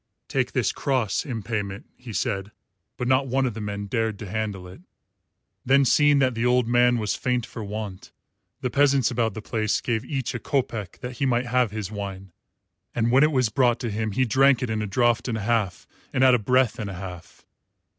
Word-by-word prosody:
"Take - - -1
this - - +1
cross 130 -1 -1
in 115 -5 -4
payment," 105 +1 -4
he 125 -2 -10
said, 100 -1 -2 0.5
but 125 - -2
not 130 +1 +3
one 130 +1 +1
of 125 - -1
the 110 - -6
men 100 -1 -4
dared 110 0 -1
to 105 - -8
handle 100 -2 -3
it. 90 +1 -13 0.8
Then 135 +1 +4
seeing 145 +2 +4
that 130 -2 +3
the 115 0 -2
old 125 -1 +3
man 120 0 +4
was 105 -2 -1
faint 125 -2 -1
for 115 - -8
want, 105 -2 -6 0.5
the 125 - -2
peasants 140 -2 +3
about 115 -4 0
the 110 - -6
place 110 -1 0
gave 115 -2 -1
each 135 -1 -3
a 125 - -3
kopeck 115 -8 -2
that 125 0 -6
he 135 - +1
might 125 0 +1
have 125 -1 +2
his 105 -1 -5
wine; 95 -2 -6 0.6
and 115 0 +1
when 130 +2 +5
it 155 +1 +5
was 130 -5 +2
brought 120 0 +2
to 120 -4 -2
him 110 0 -2
he 130 +5 +2
drank 130 +3 +4
it 120 - -2
in 110 -1 -1
a 105 - -2
draught 120 +4 +1
and 115 -3 -1
a - - -4
half 105 -4 -1 0.3
and 130 - +1
at 130 -1 +7
a 125 - +4
breath 125 +2 +2
and 105 -2 -3
a 95 - -6
half. 90 -1 -9
115 Hz, 215 wpm, -25 LUFS, 105-130 Hz, 0.8 s, at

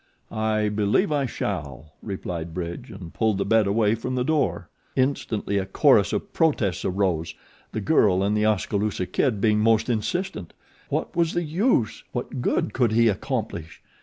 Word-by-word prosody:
"I 110 -1 0
believe 105 - +1
I 140 -3 +1
shall," 70 - -5
replied 85 -5 -5
Bridge 90 +7 -5
and 95 -6 -10
pulled 110 -3 +1
the 100 - -1
bed 110 -2 +3
away 105 +1 +2
from 125 +3 -3
the 125 - +1
door. 140 - 0 0.3
Instantly 115 -6 0
a 95 - -3
chorus - - +4
of - - -3
protests 110 - +1
arose, 90 -4 -1 0.4
the 110 - -3
girl 100 -7 +3
and 100 +2 +1
The 105 0 +2
Oskaloosa 105 -1 0
Kid 115 +2 0
being 105 0 +3
most 110 +2 +3
insistent. 120 - -3 0.4
What - - -2
was 165 -1 +1
the 175 - 0
use? 165 - 0
What 125 +1 -4
good 110 - 0
could 120 -4 +2
he 115 0 +5
accomplish? 80 -4 -4
110 Hz, 165 wpm, -24 LUFS, 95-125 Hz, 0.4 s, he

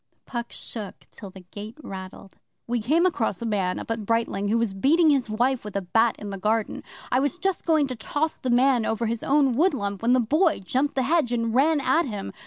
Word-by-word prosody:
Puck 235 -2 -5
shook 210 -4 -7
till 200 - -9
the 190 0 -12
gate 205 - -10
rattled. 190 0 -9 0.3
'We 240 -1 -1
came 310 +10 +2
across 230 - 0
a 235 - -4
man 195 -5 0
up - - -6
at 225 -1 -2
Brightling 225 -2 0
who 220 +3 +2
was 230 -4 0
beating 305 - +4
his 265 -5 +1
wife 245 +4 0
with 210 -1 -8
a 200 - -1
bat 225 +5 +2
in 205 -1 -7
the 195 - -6
garden. 215 +2 -1 0.3
I 255 - +3
was 285 +6 0
just 385 -1 -2
going 315 -3 +4
to 260 -2 -5
toss 295 +7 -2
the 255 - -3
man 250 0 +3
over 225 +1 -1
his 230 0 -2
own 275 -2 +3
woodlump 240 - 0
when 235 +2 +3
the 255 - +4
Boy 305 - +2
jumped 260 +9 -1
the 265 - +1
hedge 290 -2 +1
and 230 -2 -1
ran 295 +5 +3
at 275 +5 +2
him. 205 -4 -5
235 Hz, 225 wpm, -25 LUFS, 210-275 Hz, 0.3 s, beating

